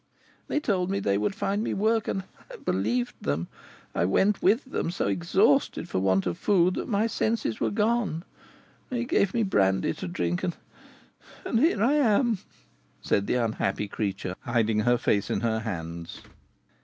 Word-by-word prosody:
They - - 0
told 190 -10 0
me 195 0 0
they 100 - +1
would 105 - -1
find 205 +2 -1
me - - -2
work, 220 +2 +1
and 190 - -2 0.3
I - - -7
believed 115 +6 -1
them. 75 +4 -1 0.5
I - - +1
went 190 - +2
with 220 +9 +3
them, 260 - -2
so 175 - -2
exhausted 95 -4 +2
for - - -1
want 95 0 +2
of 90 -2 -2
food 185 -3 +3
that - - -4
my 210 0 +2
senses 220 - -1
were - - +1
gone. 210 -6 0 0.7
They 245 -1 -2
gave 200 -6 +2
me 230 - +2
brandy 95 - +2
to - - -6
drink, 85 0 -2
and 175 - -1 0.9
and 225 - +1
here 260 - +3
I 260 +5 +4
am!" 235 -5 +3 0.6
said 100 - +1
the - - +1
unhappy 110 -4 -1
creature, 100 -3 -3
hiding 115 -4 +1
her 120 +3 +3
face 100 -3 0
in - - -1
her 110 -1 0
hands. 85 -6 -6
125 Hz, 170 wpm, -27 LUFS, -, 0.9 s, I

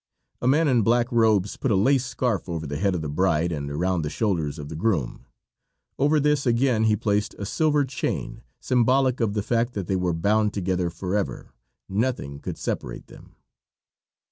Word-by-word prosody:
A 120 - 0
man 150 +5 +4
in 125 -4 +3
black 120 +3 +2
robes 110 -4 +2
put 135 - -1
a 105 - +3
lace 130 +7 +3
scarf 120 -5 -2
over 80 -2 -3
the 70 0 -4
head 100 -2 +1
of 80 - -3
the - - -3
bride 85 +2 +1
and 70 -3 -3
around 90 +4 0
the 75 - -3
shoulders 80 -6 -1
of 75 -2 -7
the 80 - -7
groom; 80 - -1 0.7
over 145 +3 +3
this 150 -2 +1
again 120 -2 +2
he 110 -1 +4
placed 105 0 -1
a 100 - -5
silver 150 +5 +1
chain, 130 0 -4 0.2
symbolic 130 +1 +2
of 110 -3 0
the 105 - 0
fact 120 +2 0
that 100 -3 -3
they 95 - -1
were 90 -2 0
bound 105 +5 +1
together 90 -2 -1
forever 90 -5 -3 0.3
nothing 100 - -2
could - - -6
separate - - -4
them. - - -15
105 Hz, 185 wpm, -24 LUFS, 85-120 Hz, 0.7 s, man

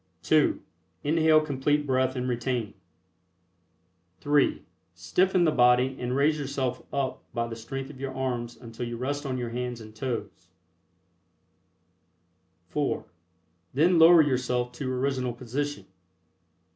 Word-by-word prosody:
(2) - - +3 0.4
Inhale 155 +1 +4
Complete 145 0 0
Breath 130 -1 +1
and 125 0 -2
retain. 120 -3 -2 1.5
(3) 145 0 +2 0.3
Stiffen 175 - +2
the 160 - +4
body 125 0 +4
and 125 0 -2
raise 150 +2 +2
yourself 135 -3 -2
up 135 -2 -2
by 115 0 0
the 115 -1 -6
strength 135 +5 -6
of 135 - -14
your 135 0 -4
arms 125 -3 -3
until 115 0 -7
you 120 0 -5
rest 145 +3 -3
on 130 -1 -2
your 120 -2 -4
hands 125 0 -4
and 110 -1 -12
toes 125 0 -5 2.2
(4) - - -1 0.7
Then 165 +4 +4
lower 165 0 +8
yourself 125 -3 0
to 130 +1 -4
original 130 -1 -1
position. 140 +5 -4
130 Hz, 125 wpm, -27 LUFS, 120-145 Hz, 2.2 s, lower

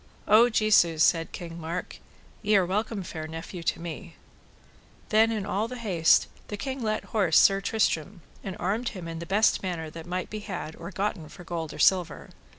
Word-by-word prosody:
O 225 +4 +6
Jesu, 215 -7 +4
said 165 +1 +3
King 170 -1 -7
Mark, 170 +3 -5 0.4
ye 210 -1 +2
are 190 - +3
welcome 205 +2 -2
fair 160 -2 -6
nephew 165 +3 -7
to 165 - -1
me. 170 -1 -7 0.9
Then 220 +1 +4
in 215 -3 -2
all 205 +4 -1
the 250 +1 -7
haste 185 -9 +3 0.2
the 205 - -5
king 265 +3 -4
let 215 -1 -1
horse 190 -8 +3
Sir 195 0 +5
Tristram, 195 -4 -1 0.2
and 190 -2 -5
armed 215 +7 -1
him 175 -2 -7
in 165 0 -6
the 170 - -7
best 210 +3 +3
manner 170 -4 -4
that 165 +1 -9
might 180 +1 -3
be 215 - -4
had 185 -6 -6
or 170 - -7
gotten 195 -6 -3
for 175 - -12
gold 165 -2 -4
or - - -9
silver. 180 -5 +2
185 Hz, 190 wpm, -27 LUFS, 165-215 Hz, 0.9 s, O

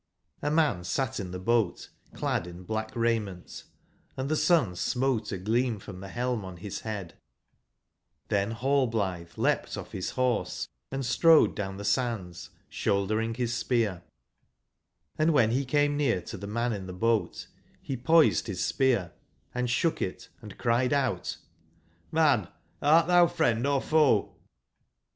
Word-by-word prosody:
H 145 - 0
man 150 - +2
satin 100 0 -2
the 90 - -5
boat 115 +4 0 0.3
clad 85 - -1
in 90 +1 -10
black 110 +2 -3
raiment, 110 -6 -2 0.2
& - - -38
the 135 +4 -1
sun 150 - +3
smote 125 +2 0
a 100 - -2
gleam 115 +5 0
from 95 -1 -10
the 95 - -8
helm 120 +1 -2
on 95 -1 -8
his 100 +2 -6
headjj^ 100 -6 -5 1.2
XThen 100 +2 0
nallblithe 110 -11 0
leapt - - 0
off - - -8
his 95 - -3
horse, 125 -2 0 0.2
and 135 -1 -3
strode 160 +6 +5
down 95 -2 -4
the 100 - -6
sands 110 -8 -2 0.2
shouldering 110 +3 0
his 120 -1 -1
spear; 115 -7 0 1.2
and 155 +1 +3
when 115 -7 +4
he 130 +4 +1
came 145 +2 +2
near 135 -10 +2
to - - -7
the 100 - -7
man 115 +3 -1
in 95 -2 -6
the 90 - -6
boat 110 -1 0 0.3
he 135 - -4
poised 155 +5 +4
his 95 -4 -2
spear 120 - +1 0.4
and 125 0 -1
shook 155 +7 +1
it 90 - -4
and 105 -3 -11
cried 120 +3 +1
out: 130 -11 -1 0.7
JVIan, - - +3 0.3
art 160 +3 +5
thou 175 0 +5
friend 120 -3 +1
or 140 -1 +2
foe?" 150 -7 +2
115 Hz, 150 wpm, -28 LUFS, 100-130 Hz, 1.2 s, strode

